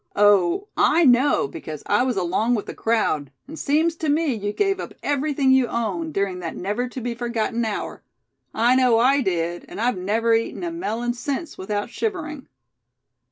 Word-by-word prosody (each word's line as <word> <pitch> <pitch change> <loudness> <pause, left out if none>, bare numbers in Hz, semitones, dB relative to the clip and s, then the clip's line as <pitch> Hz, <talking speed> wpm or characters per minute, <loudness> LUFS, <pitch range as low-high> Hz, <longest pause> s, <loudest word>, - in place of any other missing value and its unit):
Oh! 205 - +4
I 335 0 +4
know, 255 - +4
because 150 +1 -8
I 205 - +2
was 250 -4 0
along 190 +7 +1
with 210 - -3
the - - -7
crowd; 155 - 0 0.2
and 315 +3 -9
seems 315 +3 +1
to 315 - -2
me 300 -1 +2
you 205 -2 -3
gave 390 - 0
up - - -7
everything 285 -1 +1
you 260 -2 +4
owned, 185 -10 -3
during 195 -2 -1
that 170 -2 -5
never 210 +7 -2
to 255 - -6
be 240 0 -3
forgotten 235 0 -2
hour. 220 -2 -4 0.5
I 240 +3 +3
know 250 -3 +4
I 265 +4 +4
did; 175 -4 -1
and - - -8
I've 235 -4 0
never 225 +5 +1
eaten 225 +9 -1
a 340 - -2
melon 240 - -2
since 280 +6 -4
without 205 +4 -3
shivering." 315 -10 -4
235 Hz, 180 wpm, -23 LUFS, 205-275 Hz, 0.5 s, Oh